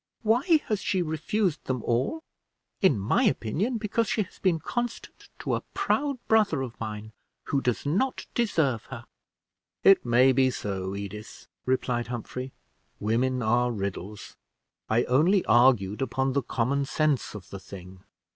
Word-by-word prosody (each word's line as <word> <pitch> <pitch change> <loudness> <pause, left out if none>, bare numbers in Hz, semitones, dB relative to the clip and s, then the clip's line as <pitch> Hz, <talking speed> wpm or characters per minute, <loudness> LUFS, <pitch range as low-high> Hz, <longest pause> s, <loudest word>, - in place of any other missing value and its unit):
Why 260 - +4
has 210 -3 -1
she 185 -2 0
refused 165 +3 -1
them 130 -3 -2
all 130 - -1 0.6
I 195 - +7
In 140 - +1
my 100 +1 +1
opinion, 195 - 0
because 225 +1 0
she 215 - +1
has 185 - -17
been 185 -4 +2
constant 240 +8 -5
to - - -3
a - - 0
proud 280 -1 0
brother 210 -11 +3
of 120 -3 -8
mine, 110 -1 -6 0.3
who 140 - -1
does 125 0 -1
not 200 - 0
deserve 160 - +1
her!" - - -9 0.8
"It 195 - +6
may 125 +2 +5
be 130 0 +3
so, 95 -5 -4
Edith," 100 +2 -8 0.2
replied 125 -2 0
Humphrey. 125 +2 -5 0.5
"Women 125 +4 0
are 120 +2 +2
riddles 100 -1 -5 0.5
I 115 +2 +3
only 170 +10 +3
argued 120 -5 +4
upon 135 +1 0
the 140 - +2
common 135 +3 0
sense 145 -5 0
of 95 -4 -10
the 100 - -6
thing." 95 -1 -11
130 Hz, 150 wpm, -27 LUFS, 110-185 Hz, 0.8 s, I